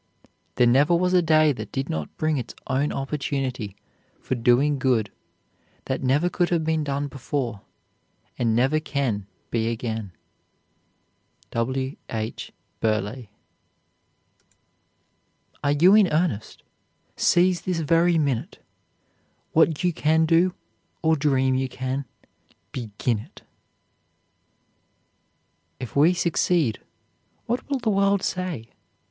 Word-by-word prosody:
There 125 Hz, -, +4 dB
never 140 Hz, +8 st, +4 dB
was 180 Hz, +1 st, +1 dB
a 180 Hz, -, +5 dB
day 155 Hz, -2 st, +4 dB
that -, -, -8 dB
did 135 Hz, 0 st, -2 dB
not 80 Hz, -2 st, -5 dB
bring 155 Hz, -1 st, +1 dB
its 120 Hz, -, -7 dB
own 140 Hz, +2 st, 0 dB
opportunity 135 Hz, -6 st, -3 dB, 0.4 s
for -, -, -3 dB
doing 130 Hz, +4 st, +3 dB
good 120 Hz, -7 st, +1 dB, 0.7 s
that 130 Hz, -, -2 dB
never 140 Hz, +6 st, +2 dB
could 175 Hz, 0 st, 0 dB
have 170 Hz, -2 st, +1 dB
been 160 Hz, -1 st, 0 dB
done 140 Hz, 0 st, -2 dB
before, 130 Hz, -5 st, -4 dB, 0.7 s
and 115 Hz, -2 st, +1 dB
never 135 Hz, +6 st, +3 dB
can 130 Hz, -10 st, -2 dB, 0.2 s
be 115 Hz, -1 st, 0 dB
again. 110 Hz, -3 st, -4 dB, 1.4 s
W. 130 Hz, +4 st, -2 dB
H. 110 Hz, -3 st, -4 dB, 0.3 s
BURLEIGH. 110 Hz, +2 st, -1 dB, 2.3 s
"Are 140 Hz, -, +2 dB
you 175 Hz, +7 st, +6 dB
in 210 Hz, -2 st, +6 dB
earnest? 150 Hz, -, -1 dB, 0.5 s
Seize 180 Hz, 0 st, +3 dB
this 180 Hz, -3 st, -2 dB
very 165 Hz, +2 st, +3 dB
minute; 140 Hz, -7 st, -1 dB, 0.9 s
What 160 Hz, 0 st, +3 dB
you 180 Hz, -1 st, +2 dB
can 160 Hz, +1 st, +2 dB
do, 170 Hz, +3 st, +3 dB, 0.5 s
or 160 Hz, 0 st, +4 dB
dream 135 Hz, -3 st, +2 dB
you 130 Hz, 0 st, 0 dB
can, 130 Hz, +2 st, -3 dB, 0.7 s
begin 115 Hz, -1 st, -2 dB
it." 105 Hz, -, -14 dB, 2.4 s
"If 125 Hz, -, -7 dB
we 160 Hz, +6 st, +5 dB
succeed, 165 Hz, -, +1 dB, 0.7 s
what 240 Hz, +4 st, -3 dB
will 280 Hz, -, +1 dB
the 235 Hz, -4 st, 0 dB
world 195 Hz, 0 st, +2 dB
say?" 175 Hz, -11 st, -3 dB
140 Hz, 115 wpm, -24 LUFS, 120-165 Hz, 2.4 s, you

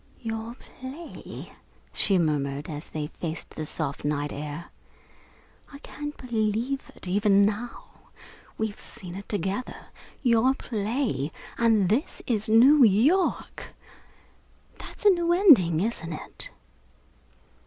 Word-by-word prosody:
"Your 225 Hz, +1 st, -4 dB
play!" 265 Hz, +7 st, -10 dB, 0.4 s
she 195 Hz, -2 st, +4 dB
murmured, 145 Hz, -3 st, 0 dB
as 150 Hz, 0 st, -6 dB
they 155 Hz, -1 st, -3 dB
faced 160 Hz, +1 st, -6 dB
the 155 Hz, -, -4 dB
soft 145 Hz, -3 st, -2 dB
night 145 Hz, 0 st, -1 dB
air. 150 Hz, +3 st, -6 dB, 1.0 s
"I 280 Hz, -, -9 dB
can't 295 Hz, 0 st, -7 dB
believe 235 Hz, +2 st, -1 dB
it, -, -, -9 dB
even 200 Hz, +1 st, +4 dB
now. 215 Hz, +4 st, -5 dB, 0.5 s
We've 220 Hz, -1 st, -3 dB
seen 180 Hz, -2 st, -10 dB
it 195 Hz, +2 st, -8 dB
together 200 Hz, +4 st, -2 dB, 0.5 s
your 245 Hz, +1 st, +4 dB
play 220 Hz, -, -2 dB, 0.2 s
and 225 Hz, -5 st, +3 dB
this 230 Hz, -, -1 dB
is 220 Hz, -3 st, 0 dB
New 260 Hz, +6 st, +7 dB
York! 245 Hz, -, +2 dB, 1.0 s
That's -, -, -10 dB
a 410 Hz, -, +9 dB
new 345 Hz, -2 st, +2 dB
ending, 235 Hz, -, +6 dB
isn't 180 Hz, -6 st, -2 dB
it?" -, -, -7 dB
215 Hz, 115 wpm, -26 LUFS, 170-255 Hz, 1.0 s, a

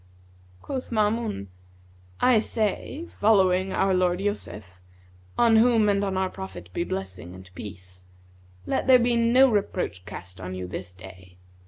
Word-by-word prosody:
Quoth 260 Hz, -2 st, -5 dB
Maamun, 215 Hz, -, 0 dB, 0.8 s
'I 250 Hz, -3 st, +5 dB
say, 225 Hz, -, -2 dB
following 190 Hz, -3 st, +3 dB
our 195 Hz, 0 st, +1 dB
lord 180 Hz, -1 st, +2 dB
Joseph 105 Hz, -, -5 dB, 0.6 s
(on 230 Hz, -2 st, +5 dB
whom 225 Hz, -2 st, +4 dB
and 200 Hz, 0 st, +1 dB
on 195 Hz, -1 st, -1 dB
our 190 Hz, 0 st, 0 dB
Prophet 90 Hz, -2 st, -9 dB
be 170 Hz, -, -1 dB
blessing 95 Hz, -, -6 dB
and 95 Hz, 0 st, -13 dB
peace!) 90 Hz, -2 st, -10 dB, 0.6 s
let -, -, -1 dB
there 260 Hz, -1 st, +8 dB
be 240 Hz, 0 st, +2 dB
no 235 Hz, +3 st, +5 dB
reproach 190 Hz, -, -2 dB
cast 90 Hz, +1 st, -9 dB
on 90 Hz, 0 st, -5 dB
you 90 Hz, 0 st, -5 dB
this 90 Hz, 0 st, -7 dB
day. 90 Hz, 0 st, -14 dB
185 Hz, 145 wpm, -25 LUFS, -, 0.8 s, there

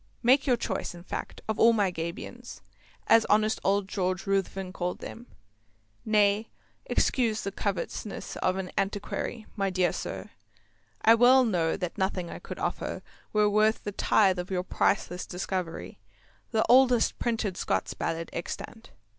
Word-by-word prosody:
Make 265 Hz, +4 st, +4 dB
your 250 Hz, -2 st, +4 dB
choice, 200 Hz, -, -3 dB
in 175 Hz, -, -11 dB
fact, -, -, -6 dB
of 220 Hz, 0 st, -2 dB
all 230 Hz, +1 st, +7 dB
my 205 Hz, -4 st, +2 dB
Gabions, 170 Hz, +1 st, -7 dB, 0.4 s
as 225 Hz, -, +6 dB
honest 215 Hz, +1 st, +2 dB
old 200 Hz, 0 st, +2 dB
George 185 Hz, -1 st, -2 dB
Ruthven 195 Hz, -1 st, -1 dB
called 180 Hz, -1 st, -2 dB
them. 240 Hz, +2 st, -9 dB, 0.8 s
Nay, 210 Hz, 0 st, +2 dB, 0.4 s
excuse 230 Hz, -4 st, +1 dB
the 200 Hz, -, -3 dB
covetousness 200 Hz, +1 st, -4 dB
of 185 Hz, -, +1 dB
an 190 Hz, -1 st, -4 dB
Antiquary, 205 Hz, +3 st, -3 dB
my 195 Hz, -2 st, 0 dB
dear 185 Hz, -1 st, +1 dB
sir; -, -, -6 dB, 0.7 s
I 225 Hz, -, +8 dB
well 250 Hz, +3 st, +6 dB
know 170 Hz, -7 st, +1 dB
that 180 Hz, 0 st, -4 dB
nothing 190 Hz, -2 st, -1 dB
I -, -, -7 dB
could -, -, -8 dB
offer -, -, -3 dB, 0.3 s
were 210 Hz, -1 st, +3 dB
worth 215 Hz, +1 st, +2 dB
a 205 Hz, -, -2 dB
tithe 195 Hz, -2 st, +3 dB
of 180 Hz, -, -5 dB
your 180 Hz, -2 st, -1 dB
priceless 180 Hz, -1 st, 0 dB
discovery, 180 Hz, -, -4 dB, 0.5 s
the 220 Hz, -1 st, +1 dB
oldest 250 Hz, -2 st, +5 dB
printed 220 Hz, -5 st, -1 dB
Scots 95 Hz, -, -1 dB
Ballad 165 Hz, 0 st, -3 dB
extant. 225 Hz, +6 st, -6 dB
200 Hz, 150 wpm, -28 LUFS, 185-220 Hz, 0.8 s, I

